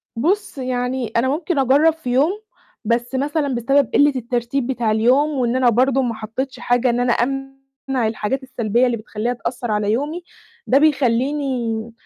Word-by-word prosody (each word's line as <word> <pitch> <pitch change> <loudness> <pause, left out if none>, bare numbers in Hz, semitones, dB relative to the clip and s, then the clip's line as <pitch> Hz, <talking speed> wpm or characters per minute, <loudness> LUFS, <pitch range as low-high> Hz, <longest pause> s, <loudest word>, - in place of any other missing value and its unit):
بُص، 345 - -1
يعني 250 -1 -2
أنا 240 +3 +2
ممكن 310 +2 -1
أجرّب 280 +5 +4
في 320 -6 -7
يوم 275 +7 +3 0.5
بس 235 +3 -1
مثلًا 285 0 -1
بسبب 270 +2 +2
قلِّة 290 0 +4
الترتيب 240 +1 -2
بتاع 240 -4 0
اليوم 250 +7 +3
وإن 255 -5 -1
أنا 255 -1 +4
برضه 260 +3 +2
ما 240 -3 -1
حطّيتش 225 +5 -5
حاجة 245 +1 +1
إن 240 +1 0
أنا 245 -1 +2
أمنع 270 -1 -3
الحاجات 225 +4 -2
السلبية 240 -2 0
اللي 240 -2 0
بتخلّيها 215 +2 -3
تأثّر 240 -1 -4
على 210 0 0
يومي، 295 +9 -2 0.4
ده 270 - +4
بيخلّيني 255 -4 0
255 Hz, 160 wpm, -20 LUFS, 235-275 Hz, 0.5 s, أجرّب